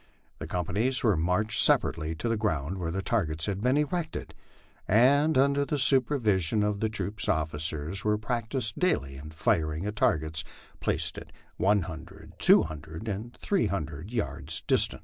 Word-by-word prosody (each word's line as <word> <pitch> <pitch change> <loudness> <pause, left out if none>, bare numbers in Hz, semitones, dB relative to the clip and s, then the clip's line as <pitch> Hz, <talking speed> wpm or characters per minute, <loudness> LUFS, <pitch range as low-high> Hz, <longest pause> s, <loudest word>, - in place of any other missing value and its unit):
The 75 - -6
companies 105 +10 0
were 110 -5 +3
marched 90 +7 +2
separately 80 0 +2
to 90 - -3
the 115 - +1
ground 95 -5 -2
where 85 -2 -3
the 95 +3 -3
targets 80 -9 0
had 100 -1 -3
been 125 +4 +2
erected, 155 +2 -2 0.5
and, 140 +8 +4
under 140 +1 +3
the 150 +1 -2
supervision 115 - +2
of 105 -1 -1
the 110 - 0
troop 110 0 -5
officers, 80 +3 -1
were 105 0 +2
practised 115 +1 -2
daily 70 - 0
in 75 +3 -9
firing 80 +1 0
at 105 0 -3
targets 80 -5 +1 0.4
placed - - -1 0.4
one 100 -1 +2
hundred, 80 -2 -10
two - - +6
hundred, 80 +6 -8
and 110 +4 -5
three 200 -2 0
hundred 80 0 -5
yards 80 - -3
distant. - - +1
100 Hz, 155 wpm, -28 LUFS, 80-120 Hz, 0.5 s, two